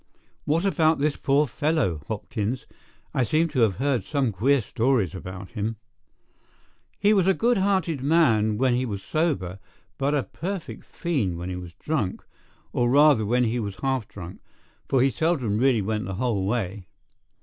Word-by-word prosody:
What 165 +5 +1
about 160 -4 +3
this 145 +1 0
poor 145 +2 +2
fellow, 140 - 0
Hopkins? 110 +2 -3 0.5
I - - +1
seem 155 +7 +2
to 145 -4 -2
have 110 -5 +3
heard 135 -5 0
some 135 0 0
queer 130 +9 +2
stories 115 -4 0
about 95 0 -8
him." 110 0 -3 1.2
"He 205 +1 +4
was 190 -3 +3
a 190 - +4
good 235 -2 +2
hearted 190 -7 +1
man 120 -9 +3
when 130 +1 +2
he 125 +1 +1
was 100 -6 -4
sober, 100 - -1 0.4
but 140 +2 +1
a 140 - +1
perfect 185 +1 -6
fiend 125 - -2
when 90 +2 -5
he - - -3
was 90 -2 -8
drunk, 105 - -2 0.5
or 120 0 +2
rather 140 -5 +5
when 125 +3 +2
he 120 +1 0
was 100 -3 -4
half 130 -5 0
drunk, 90 -2 -9 0.5
for 130 -2 +3
he 135 - +3
seldom 135 -11 0
really 125 -4 +3
went 105 0 -2
the 95 0 -4
whole 105 -4 0
way. 100 -4 -2
125 Hz, 170 wpm, -25 LUFS, 105-150 Hz, 1.2 s, rather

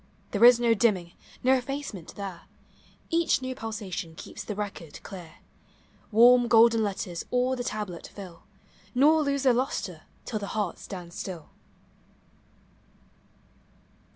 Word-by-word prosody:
There 205 +1 +1
is 240 0 +9
no 235 -1 +4
dimming, 195 -6 +1 0.3
no 260 +1 +5
effacement 260 - -4
there; 195 -4 -7 0.6
Each 335 -3 +2
new 260 0 -4
pulsation 205 -8 -5
keeps - - -8
the 210 - -5
record 200 -6 -6
clear; 175 -5 -9 0.8
Warm, 240 +2 +6
golden 230 0 +6
letters 190 -4 -3
all 250 +1 +1
the 245 - -4
tablet 210 -7 -5
fill, 185 -4 -11 0.5
Nor 305 +5 +5
lose 280 -2 0
their 260 -2 +5
lustre 255 +3 -2 0.2
till 215 - -3
the 200 +1 -5
heart 205 -5 -1
stands 175 -3 -9
still. 175 -6 -6
220 Hz, 125 wpm, -27 LUFS, 190-250 Hz, 0.8 s, is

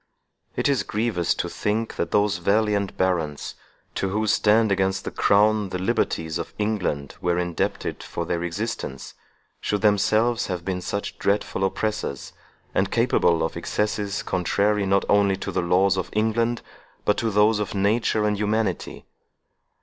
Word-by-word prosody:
It - - +1
is 140 -3 +2
grievous 105 -5 0
to - - -2
think 110 +2 -2
that - - -1
those 105 -1 +2
valiant 100 +1 +1
barons, 85 -6 -1 0.4
to 95 - -1
whose 105 +2 +1
stand 110 0 +3
against 95 0 +1
the - - -3
crown 105 0 +3
the 90 - -3
liberties 80 -3 -1
of - - -6
England 95 -10 -1
were 90 0 +1
indebted 90 -1 -2
for 85 - -4
their 85 0 -2
existence, 85 - -4 0.5
should 105 -1 -1
themselves 110 +4 +2
have 90 -3 -4
been 90 -1 -2
such 100 +3 -4
dreadful 100 -1 0
oppressors, 95 -8 -2 0.4
and - - +1
capable 85 -1 +2
of 80 - -2
excesses 105 -1 -2
contrary 100 +3 +1
not 100 0 +2
only 100 -1 +3
to 100 - -5
the - - 0
laws 95 +2 +3
of 95 - -2
England, 115 +2 0 0.4
but 105 - +3
to 115 - 0
those 105 +1 +3
of 105 -1 -3
nature 105 +2 +1
and 105 -1 +1
humanity. 105 -3 -1
100 Hz, 150 wpm, -24 LUFS, 90-105 Hz, 0.5 s, stand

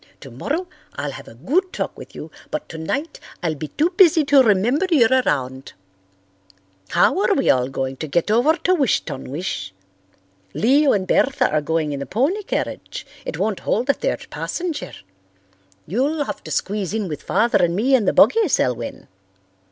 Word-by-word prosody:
Tomorrow 150 - -4 0.3
I'll 145 0 -3
have - - -10
a - - -13
good 325 - 0
talk - - -4
with - - -12
you, - - -8 0.2
but 305 -1 -4
tonight 270 - -4 0.2
I'll 165 -2 0
be 155 +1 -6
too 315 - 0
busy 345 -4 +5
to 280 -1 +6
remember 240 - +2
you're 260 -8 +4
around. 130 - -2 1.2
How - - +3
are - - +2
we - - +3
all 125 -1 +1
going 135 0 -3
to 155 - -5
get 170 +7 0
over 245 +9 +4
to 370 - +3
Wish 280 - +2
ton 135 -4 -7
wish? 115 - -4 0.8
Leo 275 +5 +4
and 190 -2 +1
Bertha 270 +6 +2
are 155 0 +1
going 155 0 -1
in 140 - -4
the 140 - -5
pony 290 - 0
carriage. 410 - -4 0.2
It - - -4
won't 215 -3 -1
hold 245 +6 +1
a - - -3
third - - -3
passenger. 345 -4 -4 0.9
You'll 280 - 0
have - - -6
to - - -7
squeeze 200 0 -2
in 215 -3 -1
with 150 -3 -5
Father 230 -4 +2
and 170 0 +1
me 245 +8 +1
in 245 -6 +4
the - - +3
buggy, 450 -3 +5
Selwyn." 120 - -1
215 Hz, 175 wpm, -21 LUFS, -, 1.2 s, to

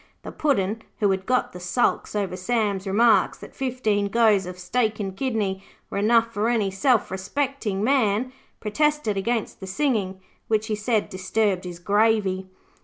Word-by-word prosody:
The - - -7
Puddin', 225 -7 0 0.2
who 205 -2 +2
had 190 0 -2
got 255 0 +1
the 180 - -8
sulks 180 +5 0
over 200 -3 -1
Sam's 200 -1 -1
remarks 225 +4 +3
that - - -12
fifteen 230 -6 0
goes 210 -3 +3
of 180 0 -7
steak 215 +4 -1
and 195 -2 -4
kidney 205 -6 -2 0.3
were - - -1
enough 230 +2 +3
for 215 +2 0
any 215 -5 +1
self 235 +3 +2
respecting 210 +1 -2
man, 250 -1 +2 0.3
protested 295 0 0
against 225 +3 -2
the 190 - -8
singing, 195 -4 -1 0.3
which, 215 -1 +1
he 215 -1 -1
said, 215 0 0
disturbed 185 0 0
his 175 -1 -6
gravy. 200 0 +1
210 Hz, 160 wpm, -24 LUFS, 190-235 Hz, 0.3 s, remarks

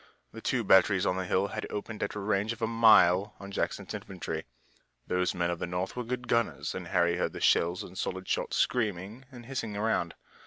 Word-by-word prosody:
The 115 - -10
two 125 -1 0
batteries 95 -1 +5
on 90 - +1
the 95 -1 -3
hill 95 +2 +1
had 110 +2 -4
opened 105 +1 -5
at - - -2
a - - -3
range 105 +2 0
of 115 - -13
a - - +4
mile 105 -4 +5
on 100 0 -9
Jackson's - - -3
infantry. - - -5 0.6
Those 90 0 0
men 85 -1 0
of 85 - -4
the - - -3
North 90 +2 -3
were 125 - -3
good 125 +1 -4
gunners 115 -1 0
and 90 -2 -6
Harry 85 -1 +2
heard - - -1
the - - -6
shells 85 +2 +2
and 90 - -11
solid 95 0 -4
shot - - -1
screaming 110 +1 -1
and 120 -2 -11
hissing 115 -5 -4
around. 105 -6 0
100 Hz, 210 wpm, -29 LUFS, 90-115 Hz, 0.6 s, batteries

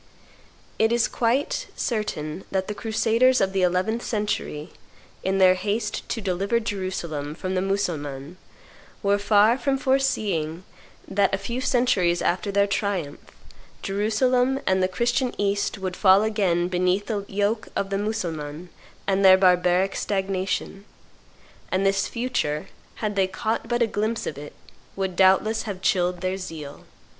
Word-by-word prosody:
It 220 +1 +3
is 235 0 +3
quite 245 +4 0
certain 190 -8 -3
that 190 -1 -1
the 210 - -3
crusaders 230 +4 +2
of 190 0 +1
the 190 - +1
eleventh 185 +6 +1
century, 205 -9 -3 0.5
in 190 +1 0
their 185 -1 +6
haste 210 +3 -3
to 230 - -2
deliver 200 +3 0
Jerusalem 185 -9 -4
from 185 +2 -4
the 185 - +1
Mussulmans, 160 -6 -3 0.7
were 200 0 +2
far 210 +4 +4
from 270 +2 +1
foreseeing 210 - 0 0.4
that, 200 0 +2
a - - -4
few 235 +6 -4
centuries 245 -10 +2
after 190 +3 0
their 200 0 +3
triumph, 200 -7 -2 0.6
Jerusalem 245 +6 +1
and 190 0 +2
the 185 - +3
Christian 240 +6 0
East 200 0 0
would 185 -2 -4
fall 195 +1 +5
again 190 -6 +1
beneath 185 +2 +1
the 210 -3 -2
yoke 205 +3 -1
of 195 0 -2
the 195 - 0
Mussulmans 170 -6 -4 0.4
and 195 0 +1
their 190 -1 +8
barbaric 180 0 +3
stagnation; 195 0 -2 0.9
and 190 +1 +1
this 195 0 +2
future, 230 -11 -2 0.3
had 210 -2 -3
they 190 -1 +2
caught 220 +4 -2
but 240 0 +1
a - - +4
glimpse 220 +1 -2
of - - -4
it, 145 0 -9 0.4
would 190 -2 -2
doubtless 195 +4 +3
have 195 -2 -5
chilled 180 -2 +1
their 185 0 -1
zeal. 160 -6 -8
195 Hz, 145 wpm, -24 LUFS, 185-220 Hz, 0.9 s, their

